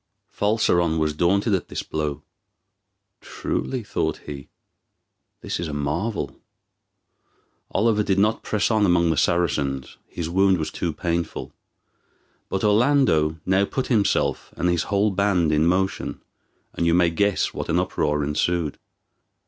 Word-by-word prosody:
Falseron 90 -6 +2
was 80 -1 0
daunted 100 +7 +2
at 95 - 0
this - - -4
blow. 75 -1 -3 1.0
"Truly," 130 -3 -3
thought 100 - -2
he, 70 -2 -8 0.9
"this - - -4
is 85 - -3
a 75 - -5
marvel." 80 +10 -2 1.3
Oliver 105 +1 +2
did 100 -2 0
not 105 +3 +2
press 105 +2 0
on 110 -2 +3
among 85 -3 +3
the - - +1
Saracens, 70 -4 0
his 85 -2 -5
wound 95 +2 +3
was 80 -2 -3
too 85 - -2
painful; 85 0 -3 1.0
but 95 - -2
Orlando 105 - +3
now 95 +1 +3
put 130 +6 -2
himself 105 -3 +1
and 90 - +1
his 85 -2 +1
whole 100 +1 +2
band 95 -4 +2
in 75 +2 +3
motion, 95 +2 -1 0.5
and 85 - 0
you 85 - +4
may 90 -1 +3
guess 100 +4 +1
what - - -5
an - - +2
uproar 75 0 0
ensued. 75 +1 -1
85 Hz, 140 wpm, -23 LUFS, 80-100 Hz, 1.3 s, you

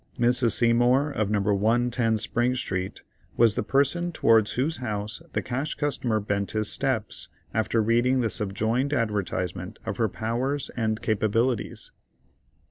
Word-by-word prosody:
Mrs. 120 -1 +3
Seymour, 120 +5 +3
of 110 -7 -1
No. 105 -1 +1
110 115 +2 +1
Spring 120 +3 0
Street, 95 -6 -4 0.3
was 115 -3 +5
the - - -1
person 145 +6 +1
towards 110 -8 +3
whose 150 +6 -1
house 110 -2 -4
the - - -1
Cash 135 +5 -3
Customer 125 -6 -1
bent 100 -1 -2
his 110 -1 0
steps, 130 -6 -1 0.3
after 110 +1 +1
reading 120 +4 +2
the 115 -3 0
subjoined 110 +7 -1
advertisement 100 - -2
of - - -4
her 115 -3 +1
powers 125 +7 -2
and 110 -2 -1
capabilities. 110 +3 0
115 Hz, 135 wpm, -26 LUFS, 110-125 Hz, 0.3 s, was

